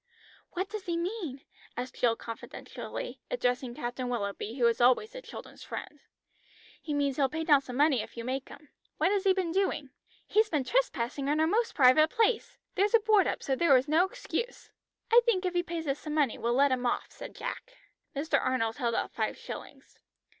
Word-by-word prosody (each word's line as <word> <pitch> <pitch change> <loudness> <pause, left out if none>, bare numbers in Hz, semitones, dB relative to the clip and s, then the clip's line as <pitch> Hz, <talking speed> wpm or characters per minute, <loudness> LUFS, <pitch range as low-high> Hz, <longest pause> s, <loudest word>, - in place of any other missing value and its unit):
"What 375 +2 -2
does 420 -1 -6
he 340 -1 0
mean?" 340 - -4 0.4
asked 250 +1 -4
Jill 235 -2 +3
confidentially, 230 - -7
addressing 250 - -1
Captain 245 +1 -4
Willoughby, 210 -1 -3
who 250 - -1
was 235 0 +2
always 255 - +4
the - - -8
children's - - -11
friend. - - -7 0.8
"He 305 - -6
means 285 -2 0
he'll 275 -2 +3
pay 320 +4 -3
down 290 -4 +5
some 255 -2 -8
money 285 -5 +4
if - - -10
you 230 - -4
make 260 +2 -3
him. 300 - -13 0.3
What 375 - +2
has 400 -1 0
he 385 - +6
been 370 -3 -1
doing?" 340 -7 0 0.3
"He 425 - +1
has 435 -1 +4
been 300 -4 0
trespassing 275 - 0
in 300 +2 +1
our 315 - +4
most 450 +8 +1
private 285 +3 +6
place. 460 +2 +1 0.2
There's 405 +4 +3
a - - +7
board 425 -3 +4
up, - - -2
so 270 - 0
there 285 -1 +5
was 255 +2 +3
no 315 +4 +4
excuse." - - -5 0.4
"I 475 +1 +8
think 410 -6 +1
if 360 - 0
he 350 - +2
pays 340 -2 -5
us 275 +1 -1
some 305 -1 -5
money 285 -7 +2
we'll 235 +1 0
let 280 +1 +4
him 250 -1 +1
off," - - -2
said - - -10
Jack. - - -6 0.4
Mr. 280 -1 +1
Arnold 240 -3 0
held 235 -4 0
out - - -1
five - - -2
shillings. - - -10
295 Hz, 205 wpm, -30 LUFS, 255-385 Hz, 0.8 s, I